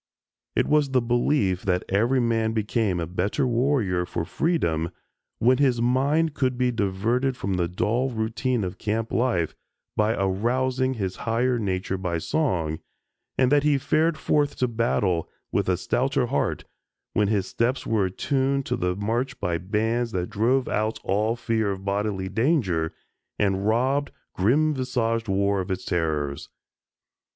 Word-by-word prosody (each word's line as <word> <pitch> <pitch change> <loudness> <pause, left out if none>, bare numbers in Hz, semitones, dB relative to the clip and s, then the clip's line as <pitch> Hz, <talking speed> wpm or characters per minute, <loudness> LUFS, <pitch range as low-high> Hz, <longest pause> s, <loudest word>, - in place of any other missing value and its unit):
It - - +3
was 150 -2 +3
the 130 -1 +3
belief 120 -5 +1
that 90 -1 0
every 115 +7 +2
man 115 -2 +1
became 105 -3 0
a 85 - -1
better 95 - -1
warrior 120 -7 +1
for 85 - -3
freedom 85 - 0 0.5
when 125 +3 +3
his 130 -4 +3
mind 140 +6 +2
could 130 -3 0
be 125 0 +2
diverted 115 +5 0
from 100 -4 -2
the 90 -2 +1
dull 115 +9 0
routine 115 +1 -1
of 90 -1 -5
camp 110 +2 -2
life 115 -10 +1 0.4
by 110 +2 +2
arousing 125 +7 0
his 95 -4 -3
higher 120 +2 0
nature 95 -2 -2
by 90 -3 -1
song, 85 - -1 0.6
and 130 0 +3
that 145 -1 +5
he 150 -1 +3
fared 155 +4 +1
forth 145 -2 +1
to 125 - +1
battle 105 -7 0 0.2
with - - 0
a 90 - +2
stouter 130 - 0
heart 70 -11 -1 0.5
when 105 - +2
his 100 -2 +1
steps 125 +6 -1
were 110 -4 +1
attuned 135 +7 0
to - - -1
the 90 0 -1
march 115 +6 -2
by 85 -4 -1
bands 110 +5 -1
that 90 -1 -2
drove 125 +5 +2
out 110 +1 0
all 105 +4 +1
fear 115 -3 0
of 95 0 -4
bodily 100 -1 -1
danger 100 - +1 0.5
and 100 0 +1
robbed 130 +6 +1 0.2
"grim 145 +11 +2
visaged 115 -4 -1
war" 100 0 +1
of 90 - -6
its 95 0 -3
terrors. 75 -5 -1
115 Hz, 155 wpm, -25 LUFS, 95-130 Hz, 0.6 s, that